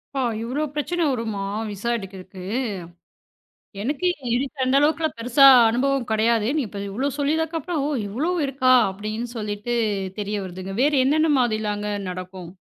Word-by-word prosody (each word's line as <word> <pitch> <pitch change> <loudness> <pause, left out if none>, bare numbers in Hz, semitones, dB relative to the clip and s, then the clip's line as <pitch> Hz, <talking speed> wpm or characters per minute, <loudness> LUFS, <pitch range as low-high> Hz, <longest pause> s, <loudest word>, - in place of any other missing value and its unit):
ஓ! - - 0 0.2
இவ்ளோ 255 +6 -2
பிரச்சனை 345 +4 -1
வருமா 225 -5 -3 0.3
விசா 205 +4 -4
எடுக்கறக்கு? 190 -2 -10 1.4
எனக்கு 285 - -2 0.3
இதுக்கு 275 +3 -3
அந்த 255 +1 +2
அளவுக்குப் 315 +1 +1
பெருசா 250 +4 +4 0.2
அனுபவம் 260 +2 0
கிடையாது. 220 0 +2 0.2
இப்ப 205 -1 -7
இவ்ளோ 255 +8 -1
சொல்லி 285 +1 +1
அதுக்கப்புறம் 320 -1 -2 0.2
இவ்ளோ 255 - -2 0.2
இருக்கா 265 -1 +2 0.2
அப்படின்னு 215 +4 -5
சொல்லிட்டு 210 +2 -3 0.4
தெரிய 205 0 -2
வருதுங்க. 185 +1 -7
வேறு 290 -2 +3
என்னென்ன 310 +3 +3
மாதிரியெல்லாம் 215 -3 0 0.3
நடக்கும்? 185 -1 -7
235 Hz, 130 wpm, -23 LUFS, 205-280 Hz, 1.4 s, பெருசா